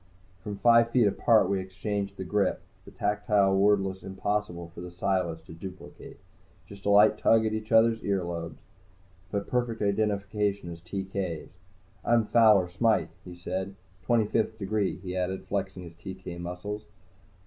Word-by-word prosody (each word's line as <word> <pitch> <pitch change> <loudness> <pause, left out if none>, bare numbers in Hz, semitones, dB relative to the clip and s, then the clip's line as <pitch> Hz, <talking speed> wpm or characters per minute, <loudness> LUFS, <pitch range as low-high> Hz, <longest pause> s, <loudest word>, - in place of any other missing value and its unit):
From 105 0 -5
five 115 +2 +5
feet 120 -1 +3
apart 105 0 +4
we 100 0 0
exchanged 100 +1 -4
the 95 - -4
grip, 100 0 0 0.2
the - - -11
tactile 105 -1 +1
password 95 -1 +2
impossible 95 -3 -3
for - - -9
the 90 - -7
Psiless 90 -3 -1
to - - -11
duplicate 90 +3 -10 0.5
just 100 +1 -9
a - - +3
light 105 +1 +6
tug 110 0 +4
at 110 - 0
each 110 +1 -5
other's 115 0 +4
ear 100 -2 0
lobes, 85 -1 -5 0.7
but 100 -1 -2
perfect 120 -2 -1
identification 100 -2 0
as 85 0 -9
TK's. 95 -2 -4 0.5
"I'm 115 -2 +3
Fowler 105 -5 +5
Smythe," 95 -2 +1
he 90 -2 -10
said. 95 +2 -4 0.3
"Twenty 115 +3 +2
fifth 110 +1 -1
degree," 105 -1 -1
he 90 -1 -6
added, 95 +1 -2
flexing 95 -2 -3
his 85 -1 -10
TK 90 +1 -8
muscles. 100 +5 -6
100 Hz, 155 wpm, -28 LUFS, 90-105 Hz, 0.7 s, light